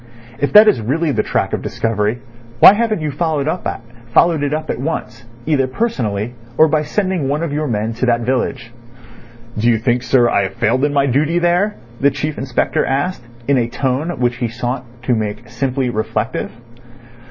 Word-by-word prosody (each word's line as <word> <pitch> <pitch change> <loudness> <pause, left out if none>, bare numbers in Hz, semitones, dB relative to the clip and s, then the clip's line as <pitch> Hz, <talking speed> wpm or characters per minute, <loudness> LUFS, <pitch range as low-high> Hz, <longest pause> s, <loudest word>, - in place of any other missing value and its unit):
If 145 - 0
that 210 +1 +9
is 130 - +3
really 150 +8 0
the 110 -5 +1
track - - -1
of - - -1
discovery, 110 0 -1 0.4
why - - +10
haven't 215 -4 0
you 155 -1 -2
followed 155 -1 -1
it 140 +1 0
up 155 +1 -3
at - - -5
once, 130 -4 -4 0.2
either 140 -4 +1
personally 120 - -2 0.2
or 160 - +6
by 155 0 +1
sending 185 -1 -1
one 150 +3 -1
of 160 -4 -3
your 150 +1 -1
men 110 -1 -1
to 120 +3 -2
that 120 -1 +2
village?" 120 -2 -2 0.9
"Do 115 - +1
you 115 - +3
think, 120 +2 0
sir, 125 -1 +3
I 110 - +2
have 95 - -6
failed 125 +5 +1
in 145 - 0
my 140 -1 +2
duty 145 +6 +1
there?" 175 +4 +2 0.2
the 140 - +4
Chief 150 +2 -4
Inspector 130 -2 0
asked, 140 +5 -1 0.3
in 140 -2 +3
a 115 - 0
tone 135 +7 -2
which 120 -1 0
he 120 - -1
sought 120 +2 -4 0.2
to 125 - +1
make 110 +1 -3
simply 125 +1 -1
reflective. 110 +1 -2
130 Hz, 185 wpm, -17 LUFS, 120-155 Hz, 0.9 s, why